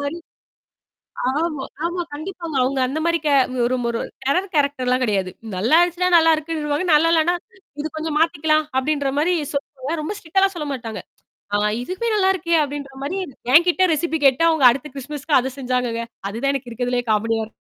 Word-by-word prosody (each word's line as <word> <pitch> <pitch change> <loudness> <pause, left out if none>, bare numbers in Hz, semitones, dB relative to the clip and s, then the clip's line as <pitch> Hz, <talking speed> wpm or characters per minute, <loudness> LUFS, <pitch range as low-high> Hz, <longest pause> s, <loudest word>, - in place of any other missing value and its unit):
மாரி. 285 +4 -3 1.1
ஆமா, 300 -2 -2 0.2
ஆமா, 350 +1 -2
கண்டிப்பாங்க. 330 0 -6
அவுங்க 265 +1 0
அந்த 295 +5 -3
மாதிரி 335 0 +2
கே 295 - +3 0.3
ஒரு 255 - +1
ஒரு 230 - -2 0.2
டெரர் 360 +8 0
கேரக்டர்லாம் 260 -3 +1
கிடையாது. 195 -5 0 0.3
நல்லா 230 +11 +3
ஆச்சுனா 355 +1 0
நல்லா 325 0 +5
இருக்குன்னுருவாங்க. 305 +1 -2
நல்லா 330 +2 +5
இல்லனா, 335 +2 +3 0.5
"இது 310 - -2
கொஞ்சம் 310 -1 -2
மாத்திக்கலாம்." 310 -1 +2
அப்டின்ற 285 0 -1
மாதிரி 350 +4 +2 0.2
சொல்லுவாங்க. 280 +1 -4
ரொம்ப 370 +7 -4
ஸ்ட்ரிக்ட்டால 385 +4 +2
சொல்ல 300 -3 -4
மாாட்டாங்க. 225 -6 -6 0.6
ஆ - - +1 0.2
இதுவுே 375 - -3
நல்லாருக்கே 375 -4 +2
அப்டின்ற 280 -1 -5
மாரி, 365 +8 -3 0.4
என்கிட்ட 350 +3 +5
ரெசிபி 320 +1 -1
கேட்டு, 270 +3 +4
அவுங்க 315 -5 +1
அடுத்த 270 +4 -3
கிறிஸ்துமஸ்க்கு 285 +2 0
அது 265 - -3
செஞ்சாங்கங்க. 250 -3 -1 0.3
அதுதான் 240 +7 -1
எனக்கு 260 -3 -5
இருக்கதிலயே 245 +1 -1
காமெடியா 225 +1 +1
இருக்கும். 220 - -12
295 Hz, 160 wpm, -21 LUFS, 255-330 Hz, 1.1 s, நல்லா